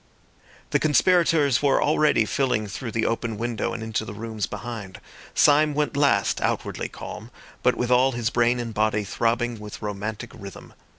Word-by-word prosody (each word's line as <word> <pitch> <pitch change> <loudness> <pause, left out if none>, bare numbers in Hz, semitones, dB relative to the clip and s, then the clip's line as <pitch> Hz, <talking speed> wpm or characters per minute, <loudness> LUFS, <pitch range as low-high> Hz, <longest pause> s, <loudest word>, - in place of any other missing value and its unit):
The - - +3
conspirators 155 -2 +3
were 140 -2 +3
already 150 -6 +3
filing 125 -2 0
through 115 +4 -6
the 110 0 -1
open 115 -1 -2
window 115 0 -2
and 115 - -5
into 110 0 -2
the 105 - -8
rooms 110 -1 -4
behind. 110 -6 -7 0.4
Syme 150 0 +4
went 150 -1 0
last, 140 0 +2
outwardly - - -2
calm, - - -9 0.3
but - - +3
with 125 0 -2
all 130 +2 +4
his 120 -2 -1
brain 120 +1 +2
and 115 -2 -4
body 105 0 +1
throbbing 115 +3 -1
with 105 0 -9
romantic 105 +3 -5
rhythm. 100 -6 -11
120 Hz, 165 wpm, -24 LUFS, 110-135 Hz, 0.4 s, Syme